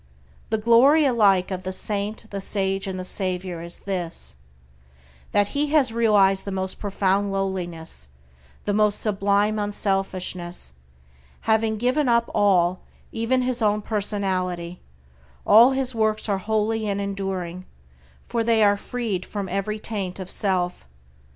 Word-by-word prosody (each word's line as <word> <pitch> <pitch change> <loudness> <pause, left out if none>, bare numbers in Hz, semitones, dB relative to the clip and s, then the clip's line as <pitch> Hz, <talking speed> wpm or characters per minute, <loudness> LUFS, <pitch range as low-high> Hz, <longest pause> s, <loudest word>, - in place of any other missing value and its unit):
The 220 - +1
glory 245 +8 +5
alike 200 -7 +3
of 185 -1 -3
the 185 0 -4
saint, 205 +3 -3
the 200 -1 -4
sage, 195 0 -1
and 190 -1 -4
the 185 - -5
savior 185 -2 -2
is 170 +1 -6
this, 180 - -4 1.0
that 205 0 +2
he 295 +1 0
has 285 -6 +2
realized 205 -4 +3
the 200 - -5
most 190 0 -3
profound 200 0 0
lowliness, 175 - -4 0.6
the 205 - 0
most 210 0 +2
sublime 205 +1 +1
unselfishness; 190 - -2 0.7
having 220 0 +1
given 255 +4 +1
up 235 0 +2
all, 185 -3 +3 0.3
even 245 +3 0
his 250 -1 0
own 210 -1 +1
personality, 185 -5 -2 0.6
all 235 +5 +7
his 265 -1 0
works 220 -1 0
are 200 -2 0
holy 220 +2 -1
and 200 -1 -1
enduring, 190 -3 -4 0.6
for 230 -1 -1
they 225 -1 +3
are 205 0 +4
freed 215 -5 -3
from 200 -2 -5
every 195 +3 -2
taint 200 -4 -4
of 185 -1 -7
self. 180 - -1
200 Hz, 140 wpm, -24 LUFS, 185-220 Hz, 1.0 s, all